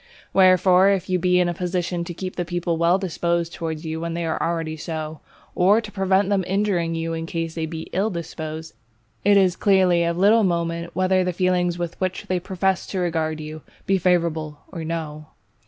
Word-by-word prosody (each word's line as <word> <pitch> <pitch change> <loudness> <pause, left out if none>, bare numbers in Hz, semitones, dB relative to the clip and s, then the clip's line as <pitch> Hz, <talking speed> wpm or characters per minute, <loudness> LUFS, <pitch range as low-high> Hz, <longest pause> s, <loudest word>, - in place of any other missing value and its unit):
Wherefore, 185 0 +5
if 190 -1 0
you 180 - +2
be 180 +1 +3
in 180 - +3
a 175 - -1
position 180 0 -2
to 175 - -6
keep 185 +1 -5
the 175 - -1
people 175 -1 -2
well 170 +2 +3
disposed 170 -2 -1
towards 160 -1 -5
you 160 0 -4
when 170 0 -3
they 170 0 -2
already 165 0 -1
are - - -8
so, 155 -1 -5 0.3
or 195 +5 +4
to 215 -2 -7
prevent 190 0 +2
them 200 -2 +2
injuring 185 -4 0
you 165 0 -2
in 165 0 -4
case 165 -1 -3
they 160 -1 -3
be 160 0 -6
ill 195 +4 +1
disposed, 160 -2 -6 0.5
it 205 0 +5
is 185 -2 +4
clearly 185 -4 +3
of 170 0 -1
little 210 +4 +5
moment 170 -2 -1
whether 185 +1 +2
the 180 0 -1
feelings 180 -1 +1
with 175 0 -5
which 185 0 -2
they 185 -1 -1
profess 190 0 -1
to 195 - -4
regard 160 -3 -1
you, 155 0 -7 0.2
be 195 -1 +2
favourable 165 -4 0
or 165 -3 -5
no. 155 -2 -5
175 Hz, 200 wpm, -23 LUFS, 165-185 Hz, 0.5 s, Wherefore